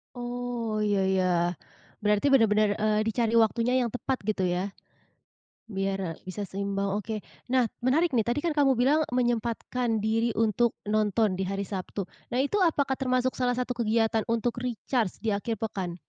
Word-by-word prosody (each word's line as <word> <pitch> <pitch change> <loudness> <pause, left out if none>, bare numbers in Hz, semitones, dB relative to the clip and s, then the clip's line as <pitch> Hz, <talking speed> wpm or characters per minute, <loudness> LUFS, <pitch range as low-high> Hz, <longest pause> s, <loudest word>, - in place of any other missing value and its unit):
Oh, 240 -2 -3
iya 205 -1 +1
iya. 190 -1 +2 0.8
Berarti 210 +2 +2
benar-benar, 215 -4 +4
eee, 215 0 +2
dicari 230 0 +1
waktunya 230 +2 +3
yang 235 - -2
tepat 260 +2 -2
gitu 200 -3 0
ya, 180 +3 -1 1.0
biar, 195 0 -1 0.2
eee, - - -31
bisa 195 +2 -4
seimbang 200 0 -2
oke. 215 0 -5 0.2
Nah 255 0 +3 0.2
menarik 300 +7 +2
nih 230 -5 +2
tadi 240 +4 +1
kan 340 - +1
kamu 290 -3 +3
bilang 265 +6 +3 0.2
menyempatkan 240 -1 0
diri 225 +1 +1
untuk 225 +2 +2
nonton 210 -2 +1
di 190 - -1
hari 195 +1 -2
Sabtu, 195 0 -4 0.2
nah 245 - -1
itu 410 +9 0
apakah 285 -7 +2
termasuk 255 -1 +1
salah 245 -1 +1
satu 250 0 -2
kegiatan 225 0 +1
untuk 230 +1 +1
recharge 240 -3 -1
di 220 - +1
akhir 205 +3 -1
pekan? 190 -5 -3
225 Hz, 160 wpm, -27 LUFS, 205-245 Hz, 1.0 s, benar-benar